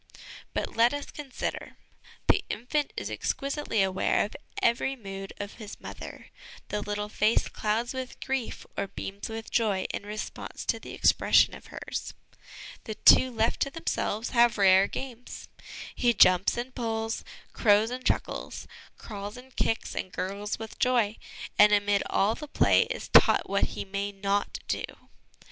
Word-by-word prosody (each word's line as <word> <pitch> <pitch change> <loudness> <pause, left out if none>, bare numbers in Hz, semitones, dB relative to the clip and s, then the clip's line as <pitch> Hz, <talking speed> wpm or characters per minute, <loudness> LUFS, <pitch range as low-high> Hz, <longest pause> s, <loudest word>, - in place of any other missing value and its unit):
But - - -2
let 235 +4 +4
us 285 - -6
consider; 285 -4 -5 0.5
the - - +4
infant 280 +6 -1
is - - -3
exquisitely 275 -7 -1
aware 190 +1 +1
of 210 - -10 0.2
every 235 +3 +1
mood 195 -4 -7
of 205 0 -6
his 210 -1 -8
mother, - - -9 0.4
the 210 - -2
little 210 0 -3
face 215 +1 +2
clouds 225 +4 -1
with 260 -1 -6
grief 265 -3 -3
or 200 - -2
beams 200 +1 -6
with 225 0 -6
joy 210 -5 +1
in - - -3
response 210 +1 -6
to - - 0
the - - -9
expression - - +4
of - - -13
hers. - - -6 0.7
The 220 - -5
two 260 - +7
left 225 -2 0
to 275 - +1
themselves 240 -7 -2
have 235 -2 +4
rare 195 -1 +6
games. 250 -2 -7 0.5
He 240 -2 +2
jumps 185 +2 +5
and 250 +2 -4
pulls, 225 -1 -2 0.3
crows 215 +1 +4
and 255 +1 -5
chuckles, - - -2 0.3
crawls 205 0 -7
and 255 0 -14
kicks 225 - -1
and 185 - -4
gurgles 200 +3 -3
with 220 -1 -9
joy; 235 -4 +2 0.4
and, 210 0 +8
amid 205 -1 +3
all 205 +3 +2
the 300 +5 -8
play, - - +4
is - - -5
taught - - +6
what 200 0 +2
he - - -3
may 200 +1 -3
not 200 0 -1
do. - - -1
220 Hz, 155 wpm, -28 LUFS, 205-245 Hz, 0.7 s, and